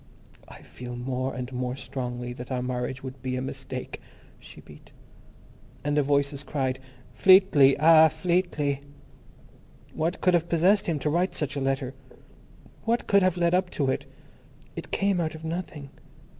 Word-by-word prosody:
"... - - -26
I - - -13
feel 125 0 -9
more 130 +1 -3
and 125 0 -6
more 125 0 -2
strongly 125 -2 -5
that 125 +1 -9
our 125 -1 -1
marriage 125 0 -3
would 130 -1 -8
be 130 -1 -3
a 130 - -2
mistake...." 130 -1 -6 0.4
she - - -13
beat. - - -16 0.9
And 145 +1 0
the 150 - +4
voices 140 0 0
cried: 130 -2 -2 0.3
Fleetly! 185 -8 +6
Ah, 160 +1 +7
Fleetly. 155 -3 -1 1.1
What 165 +4 -2
could 180 - +3
have 170 -1 +1
possessed 185 +5 +3
him 165 -3 0
to 150 +2 -1
write 175 +4 0
such 145 -2 -3
a 140 - -2
letter! 135 -1 -1 0.9
What 235 +1 0
could 200 0 +4
have 185 -1 +2
led 170 0 +2
up 180 0 +2
to 135 -3 +2
it! - - -4 0.7
It - - -7
came 195 -3 +1
out 160 -1 -2
of 160 - -11
nothing. 160 -4 -5
140 Hz, 165 wpm, -26 LUFS, 130-170 Hz, 1.1 s, Ah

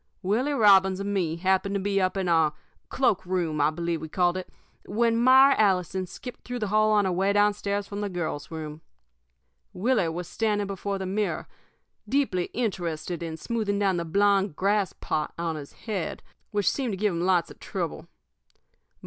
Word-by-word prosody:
"Willie 235 +10 +1
Robbins 195 -6 +5
and 200 +1 -2
me 170 -5 0
happened 190 +3 +1
to - - +1
be 195 0 0
up 185 +1 0
in 190 -2 -1
our 160 -3 +3 0.4
cloak 245 -7 +1
room, 175 -5 -1
I 145 - +4
believe 170 0 -3
we 160 - -6
called 175 +1 +2
it 185 -1 -5 0.4
when 230 +2 +1
Myra 260 +3 +7
Allison 185 -2 +1
skipped 245 +7 -9
through 245 0 -5
the 215 -4 -2
hall 215 +1 +3
on 205 -2 +3
her 190 - +1
way 190 +3 +1
down 205 0 +4
stairs 200 0 -2
from 200 0 -6
the 205 - -2
girls' 160 -5 -4
room. 155 -1 -7 0.9
Willie 210 -3 +1
was 170 +1 -5
standing 210 0 0
before 195 0 -3
the 190 - -4
mirror, 200 +2 -2 0.6
deeply 255 -11 +1
interested 175 -7 -3
in 165 -1 -5
smoothing 215 0 -2
down 195 -3 +1
the 170 - -1
blond 200 +1 +2
grass 200 +1 +1
plot 155 - -3
on 165 -1 -2
his 145 -2 -8
head, 205 -7 -4 0.3
which 205 -2 -1
seemed 255 -6 -2
to - - -3
give 205 -1 +1
him 170 - -2
lots 180 -3 +2
of - - -14
trouble. - - -4
195 Hz, 185 wpm, -26 LUFS, 175-210 Hz, 0.9 s, Myra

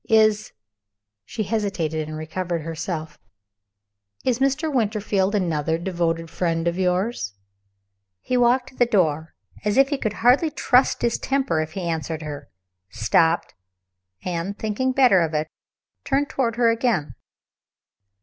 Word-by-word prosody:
"Is 215 -1 +3 0.4
" 100 0 -62
(she 215 - -3
hesitated 185 -7 -2
and 155 0 -6
recovered 170 +1 -3
herself) 160 0 -5 1.1
"Is 250 -1 +1
Mr. 275 +3 +1
Winterfield 210 -4 0
another 160 -4 0
devoted 170 -2 -1
friend 165 -1 -1
of 170 +2 -1
yours?" 180 - -1 0.8
He 255 - -2
walked 245 +2 +3
to 265 - -20
the 245 - +4
door, 160 -7 +1 0.3
as 210 +1 0
if 270 0 +5
he 285 -2 -1
could 215 -5 -1
hardly 270 +6 +5
trust 265 -3 +2
his 235 - +1
temper 270 - 0
if 155 0 -5
he 190 - -4
answered 160 -1 -3
her 145 -2 -7 0.4
stopped 160 - +1 0.7
and, 180 +3 -3
thinking 220 +5 -1
better 250 -8 +5
of 160 -1 -1
it, 150 0 0 0.6
turned 280 +1 0
toward 235 -4 0
her 235 -1 +4
again. 225 - 0
190 Hz, 140 wpm, -23 LUFS, 160-240 Hz, 1.1 s, if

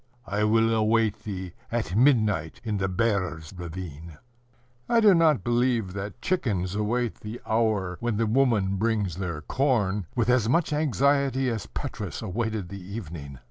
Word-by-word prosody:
I 105 0 -1
will 115 +1 +3
await 110 0 +1
thee 95 -4 -5 0.2
at 110 -7 -2
midnight 110 - +3
in 110 -3 -1
the 95 - +1
Bear's 95 -5 -1
ravine." 85 -3 -7 0.7
I 235 - +4
do 210 -3 +7
not 160 - +4
believe 120 -5 +1
that 100 +3 -6
chickens 105 - 0
await 110 +3 -1
the 110 +3 -7
hour 110 -5 0
when 120 -3 -1
the 115 - +2
woman 110 -5 +2
brings 105 -5 0
their 85 -5 -3
corn 105 - 0
with 120 -3 +1
as 125 -3 +3
much 160 +3 +2
anxiety 140 -2 +2
as 110 -5 -4
Petrus - - -5
awaited 110 -1 -2
the 100 0 -7
evening. 85 - -7
110 Hz, 150 wpm, -26 LUFS, 95-120 Hz, 0.7 s, do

